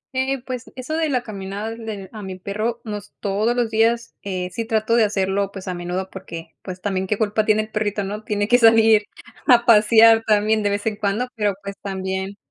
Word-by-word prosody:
Eh, 260 0 -1
pues, 255 -2 -6
eso 260 +5 -4
de 320 -2 0
la 250 -3 0
caminada 205 +1 -5
del 220 -4 -7
a 215 - -7
mi 190 -1 -6
perro, 215 +5 -3
no 210 -2 -4
es 205 0 -13
todos 210 +4 0
los 235 -2 0
días, 230 +1 +1
eh, 185 -2 -4
sí 230 - -3
trato 220 0 +1
de 230 - +5
hacerlo, 195 -1 0
pues, 195 -1 -9
a 185 - -2
menudo, 180 +2 -4
porque, 170 -4 -9
pues, 185 -1 -8
también 190 -2 -2
qué 210 +1 0
culpa 215 0 +1
tiene 215 0 +3
el 215 - -12
perrito, 210 -1 -1
¿no? 210 +2 -5
Tiene 205 -1 -1
que 245 +2 +5
salir, 225 -1 +6 0.5
a 240 -3 +6
pasear 225 0 +6
también, 215 +1 +3
de 205 - +1
vez 205 +1 -2
en 215 -2 -1
cuando, 215 +4 -1
pero, 205 -2 +1
pues, 200 0 -6
también 190 0 -4
210 Hz, 215 wpm, -21 LUFS, 195-225 Hz, 0.5 s, salir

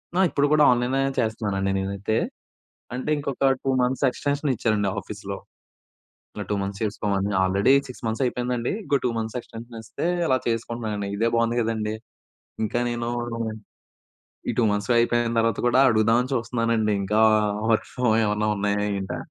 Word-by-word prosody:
ఆ! - - +2
ఇప్పుడు 145 0 +2
కూడా 150 -1 +5
ఆన్లైన్ 125 +2 +1 0.2
చేస్తున్నానండి 100 -3 -1
నేనైతే, 100 +3 -2 0.8
అంటే 130 +4 -3
ఇంకొక 140 -2 -4
2 130 0 -1
మంత్స్ 130 +3 0
ఎక్స్‌టెన్షన్ 145 +3 -2
ఇచ్చారండి. 105 -3 +1
ఆఫీస్‌లో. - - -7 1.0
ఇట్లా 105 - -5
2 105 - +1
మంత్స్ 100 +1 -5
చేసుకోమని 100 -1 -1
ఆల్రెడీ 100 +7 +3 0.2
6 125 - -10
మంత్స్ 110 +4 -1
అయిపోయిందండి. 125 -1 -1
ఇంకో 140 - +2
2 125 - +2
మంత్స్ 110 +2 -4
ఎక్స్‌టెన్షన్ 115 0 -10
ఇస్తే 115 - -4 0.2
అలా 130 - +3
చేసుకుంటున్నానండి 115 -3 -2
ఇదే 115 +2 +2
బాగుంది 115 +1 +1
కదండీ. 110 -1 -1 0.7
ఇంకా 120 +3 -1
నేను 120 0 -2 1.4
ఈ - - +3
2 120 - +3
మంత్స్ 105 +4 -1
అయిపోయిన 120 0 +2
తర్వాత 115 0 +1
కూడా 125 +2 +4
అడుగుదామని 115 +4 +2
చూస్తున్నానండి 115 -3 0
ఇంకా 105 +3 +1 0.5
వర్క్ 110 - +1
ఫ్రమ్ 125 -3 +2
ఏమన్నా 105 0 0
ఉన్నాయా 105 0 0 0.2
ఏంటా, 95 - -4
115 Hz, 145 wpm, -24 LUFS, 105-125 Hz, 1.4 s, కూడా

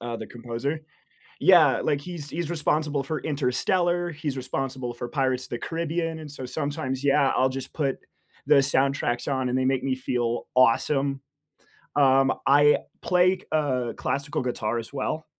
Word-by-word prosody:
uh, 120 0 -4
the 110 -1 -7
composer. 120 +6 -4 0.6
Yeah, - - +6
like, 145 -1 0
he's 160 -3 -6
he's 170 +1 -3
responsible 150 -3 0
for 150 +1 -3
Interstellar, 175 +5 0
he's 145 -3 -4
responsible 130 -1 -3
for 120 0 -6
Pirates 130 -1 0
of - - -12
the 120 - -3
Caribbean, 165 0 -3
and 150 -2 -9
so 130 -3 -7
sometimes, 135 -1 -3
yeah, 140 -1 +4
I'll 130 0 +3
just 135 0 -6
put 140 -4 -1 0.5
the 150 - +6
soundtracks 135 -2 +2
on, 130 -2 0
and 125 - 0
they 130 - +1
make 130 -1 +1
me 135 -1 0
feel 120 -2 -2
awesome. 135 +2 +3 0.8
Um, 135 -1 +4
I 145 +2 +6 0.2
play 180 +1 +3
c - - -19
uh, 130 -6 0
classical 140 +1 -2
guitar 120 -2 -2
as 115 - -7
well. 155 +3 -3
135 Hz, 165 wpm, -25 LUFS, 130-150 Hz, 0.8 s, Yeah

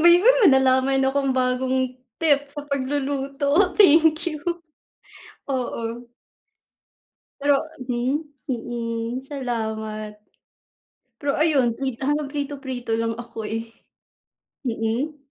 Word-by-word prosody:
May 345 +2 +8 0.3
nalaman 265 0 +3
akong 275 0 +1
bagong 255 0 +1 0.2
tip 285 -3 +2
sa 290 0 -5
pagluluto, 280 +5 0
thank 320 -4 +6
you. 305 -3 -3 1.1
Oo. 240 -2 -3 1.4
Pero 285 0 +4 0.3
mhm? 255 +5 -1 0.2
Mm, 235 -2 -3
salamat. 220 -5 -4 1.0
Pero 285 -1 0
ayun, 290 -6 +3
mm, - - -18
prito 265 -3 -2
hanggang 295 -1 0
prito-prito 275 -5 -4
lang 230 0 -1
ako, 225 -2 -6
eh. 225 +1 -4 0.9
Mm? 240 +5 -2
265 Hz, 95 wpm, -23 LUFS, 240-285 Hz, 1.4 s, May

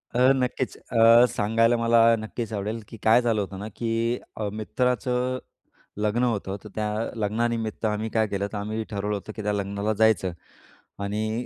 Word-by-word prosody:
अ, - - +2 0.2
नक्कीच. 130 0 -2
अ, 115 +1 +7
सांगायला 115 +3 +2
मला 115 0 +3 0.2
नक्कीच 110 +1 -5
आवडेल, 105 +3 -3
की 115 - -11
काय 115 +3 +6
झालं 115 -3 +1
होतं 95 -1 -6
ना 105 - -5
की 115 +1 -1 0.2
अ, 105 - -3
मित्राचं 125 +3 0 0.6
लग्न 105 +4 0
होतं. 100 -5 -1
तर 105 - -9
त्या 105 -1 -1 0.3
लग्नानिमित्त 110 +1 -1
आम्ही 110 +1 -1
काय 110 -1 +1
केलं, 100 0 -2
तर - - -2
आम्ही 110 +2 -3
ठरवलं 105 0 -2
होतं 100 +2 -6
की 110 - -5
त्या 105 0 0
लग्नाला 100 +1 -1
जायचं. 105 -5 +3 0.7
आणि 110 +4 -2
110 Hz, 170 wpm, -25 LUFS, 105-115 Hz, 0.7 s, अ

